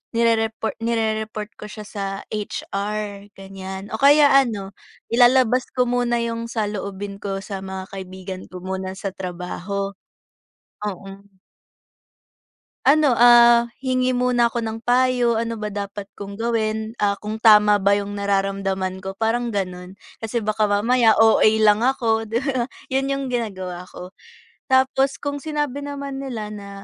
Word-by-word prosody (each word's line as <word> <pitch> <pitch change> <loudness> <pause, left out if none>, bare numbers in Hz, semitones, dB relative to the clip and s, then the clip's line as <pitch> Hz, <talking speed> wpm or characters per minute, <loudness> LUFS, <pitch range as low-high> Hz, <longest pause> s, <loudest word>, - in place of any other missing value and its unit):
nire-repor 225 -1 +1
nire-report 220 -1 -2
ko 210 - -7
siya 210 0 -9
sa 205 -1 -6 0.3
HR, 205 -1 -4
ganyan 195 0 -8
o 220 - -3
kaya 285 +1 +6
ano 225 -8 +2 0.4
ilalabas 250 +1 +4
ko 250 - +3
muna 240 -1 0
'yong 230 0 -3
saloobin 205 -3 -4
ko 195 -1 -4
sa 200 -2 -5
mga 190 0 -6
kaibigan 190 -1 -7
ko 185 -1 -10
muna 190 0 -4
sa 195 0 -4
trabaho. 185 +2 -4 0.9
O 210 - -1
hmm. 195 0 -12 1.5
Ano, 290 0 +5
ah, 235 0 +7 0.2
hingi 255 -1 +1
muna 245 -1 +3
ako 235 0 -3
ng 220 0 -4
payo, 245 0 +2
ano 230 -1 -2
ba 210 - -2
dapat 200 -1 -6
kong 200 +1 -8
gawin. 220 -1 -1
Ah, 205 -3 +2
kung 215 +1 -4
tama 210 -2 +6
ba 200 0 +2
'yong 205 0 -1
nararamdaman 195 -1 -1
ko 190 - -4
parang, 235 +1 0
gano'n. 180 -2 -4 0.2
Kasi 225 +1 -3
baka 215 0 0
mamaya 220 +3 +3
OA 225 0 +5 0.2
lang 215 +1 +4
ako, 230 -4 +1
'di 225 +2 -1
ba? 260 -3 -1 0.2
'Yon 270 +1 0
'yong 275 0 -2
ginagawa 190 -7 -4
ko. 180 +1 -11 0.5
Tapos 265 +1 +2
kung 285 0 -3
sinabi 290 -1 -3
naman 280 -1 -5
nila 240 -6 -5
na, 205 -1 -8
220 Hz, 145 wpm, -22 LUFS, 200-240 Hz, 1.5 s, ah